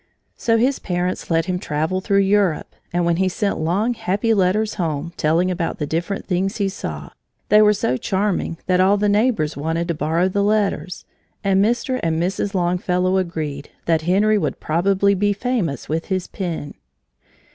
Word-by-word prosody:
So 230 -1 +1
his 255 +4 +1
parents 180 0 -2
let 165 -1 +2
him 180 0 -2
travel 160 +3 -1
through 200 0 +2
Europe, 195 -5 +1 0.2
and 175 0 0
when 170 -1 +2
he 190 +1 +2
sent 200 +2 -1
long, 190 +10 +1
happy 210 +1 0
letters 210 +2 +1
home, 165 -2 -3
telling 165 +4 +1
about 170 -2 -2
the 150 - -2
different 170 +6 -3
things 195 +3 -1
he 200 -2 0
saw, 195 - -6 0.4
they 210 0 +7
were 210 0 +6
so 130 -11 0
charming 190 0 -1
that 180 -1 +2
all 195 +2 +4
the 210 +1 +1
neighbors 205 -7 +1
wanted 160 +4 -2
to - - +2
borrow 160 +4 +1
the 200 +2 0
letters, 200 -4 0 0.4
and 195 -1 +3
Mr. 240 +3 0
and 165 -1 0
Mrs. 195 +3 -1
Longfellow 180 +1 +1
agreed 155 -6 -3 0.2
that 165 -1 +2
Henry 205 +6 +3
would 150 -7 -2
probably 195 +5 +2
be 205 +1 +1
famous 200 - -2
with 160 +2 -2
his 185 -2 -1
pen. 170 -6 -5
185 Hz, 175 wpm, -21 LUFS, 165-205 Hz, 0.4 s, they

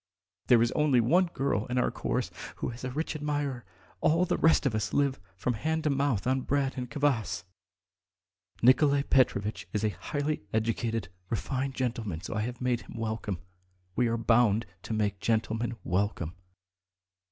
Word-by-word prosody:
There 120 -2 +6
is 120 - +1
only 150 -5 +3
one 175 +11 +4
girl 135 -8 -1
in 125 0 -2
our 125 - +2
chorus - - -2 0.2
who - - -3
has 120 +1 -8
a 130 - -2
rich 155 +5 -3
admirer; 145 -4 -2 0.3
all 165 +3 +3
the - - +1
rest 160 -2 +4
of 135 - +2
us 105 -1 -1
live 140 -4 +2 0.2
from 120 +6 0
hand 160 +8 -1
to 150 - +2
mouth 135 -7 +1
on 130 +1 +2
bread 140 0 0
and 125 -2 -4
kvass. 120 -10 0 1.2
Nikolay 140 +3 +5
Petrovitch 110 -7 +1
is 105 -1 0
a 110 - +3
highly 145 +7 -2
educated, 115 -1 -1 0.2
refined 135 +3 -2
gentleman, 115 -9 -2
so 90 - -6
I've 115 +3 -3
made 125 -2 +1
him 105 - -11
welcome. 110 -5 -3 0.5
We 125 - +3
are 115 0 0
bound 115 -1 +3 0.2
to - - -5
make 105 -2 0
gentlemen 115 +2 0
welcome." 90 -3 -1
120 Hz, 165 wpm, -29 LUFS, 110-140 Hz, 1.2 s, There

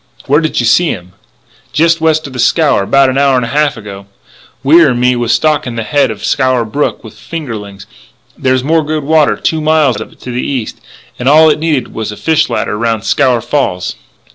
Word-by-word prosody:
"Where 145 +4 +2
did 155 - -1
you 120 - 0
see 175 +9 +3
him?" - - 0
inquired - - -3
Lannis. 95 +3 -29
"Jest 165 +2 +2
west 160 -1 +1
of 135 - -9
the 125 - -7
Scaur, 150 +1 +2
about 135 +6 +3
an 135 - -1
hour 140 -1 +3
and 125 -2 0
a - - -6
half 145 -1 0
ago. 100 -2 -10 0.6
Wier 160 +2 +5
and 120 -1 -1
me 125 0 +2
was 120 -1 -1
stockin' 145 +1 0
the 115 - -3
head 140 +2 +1
of 110 -2 -6
Scaur 130 -3 +1
Brook 140 +4 -2
with 110 - -11
fingerlings. 110 -5 -8 0.5
There's 130 -1 0
more 160 +3 +1
good 155 0 -3
water 155 +1 +2
two 160 -1 -1
miles 150 -8 +2
of - - -8
it - - -22
to 125 - -7
the 125 +1 -2
east, 130 -6 -4 0.4
and 125 +2 +1
all 155 +2 +6
it 150 - -1
needed 150 -6 -1
was 110 -1 -4
a 105 - -9
fish 160 -1 +1
ladder - - -2
around 115 -1 -1
Scaur 120 +2 +1
Falls. 95 -11 -2
130 Hz, 220 wpm, -12 LUFS, 115-155 Hz, 0.6 s, all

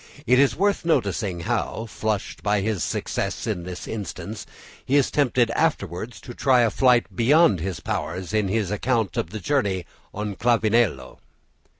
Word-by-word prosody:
It 125 +1 +4
is 140 -1 +4
worth 200 +2 +1
noticing 105 - 0
how, 110 +6 -2
flushed 110 -1 -3
by 105 -1 +1
his 105 -3 -1
success - - -2
in 85 - -3
this 90 -1 -7
instance, 105 0 -6 0.4
he 135 - 0
is 140 -2 +3
tempted 125 -5 +2
afterwards 110 - -1
to 120 - -9
try 130 0 +3
a 115 -2 +3
flight 125 -3 +3
beyond 125 - +4
his 90 +2 -4
powers 90 +4 -4
in 105 -2 +2
his 105 -1 -1
account 110 0 0
of - - -2
the 110 +3 -6
journey 100 -7 0 0.3
on 105 -1 -5
Clavileno. 110 - +1
110 Hz, 160 wpm, -24 LUFS, 95-125 Hz, 0.4 s, It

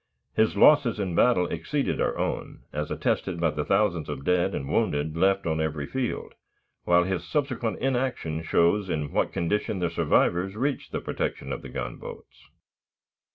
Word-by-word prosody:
His 110 -2 +2
losses 125 -2 +5
in 95 -3 -2
battle 90 -1 +4
exceeded - - -2
our - - 0
own, - - -3
as 75 +1 -3
attested 90 -3 -1
by 85 -2 +2
the 75 0 -2
thousands 95 -3 +1
of 70 - -5
dead 90 -1 +2
and 70 - -4
wounded 75 +3 0
left 95 +3 +2
on 80 -1 0
every 75 -2 -2
field, 130 - -3 0.5
while 90 0 +5
his 95 0 -2
subsequent 130 -6 -1
inaction 125 -12 -1
shows 85 +5 +2
in 75 -4 -2
what - - +1
condition 105 +4 -1
the 90 -2 -1
survivors 95 +3 +2
reached 135 +5 -2
the - - -3
protection - - -3
of - - -5
the - - -9
gunboats. - - -8
90 Hz, 160 wpm, -26 LUFS, 80-110 Hz, 0.5 s, losses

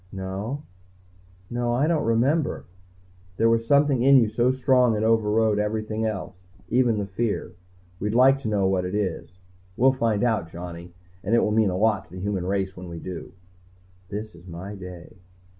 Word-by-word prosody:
"No. 95 +9 -5 0.9
No 120 0 -1
I 130 +5 +2
don't 160 -1 +1
remember 130 +8 +1 0.3
" 90 0 -30
"There 115 +2 +3
was 115 0 +1
something 140 -2 +3
in 135 +2 +7
you 115 -4 +4
so 120 +3 +2
strong 125 -3 +3
it 105 - -1
overrode 110 -1 +2
everything 110 +1 -2
else, 95 -4 -3 0.4
even 120 -3 +2
the 100 - -1
fear. 100 -1 -2 0.5
We'd 105 +2 -2
like 135 +2 +5
to 135 - -5
know 105 -3 +1
what 95 -1 +1
it 90 +2 -3
is. 95 -3 -3 0.4
We'll 130 +2 +5
find 115 -5 0
out, 110 -9 0
Johnny, 85 0 -8 0.3
and 105 +5 +1
it - - +4
will 105 - +1
mean 110 -1 +3
a 90 - -2
lot 105 -2 +1
to 80 - -19
the - - -6
human 95 -2 -2
race 95 -1 -1
when 90 -1 -9
we 85 - -7
do." 90 -1 -7 0.8
_This 105 0 -5
is 85 +2 -16
my 90 +4 -7
day. 90 -2 -10
105 Hz, 185 wpm, -25 LUFS, 95-120 Hz, 0.9 s, in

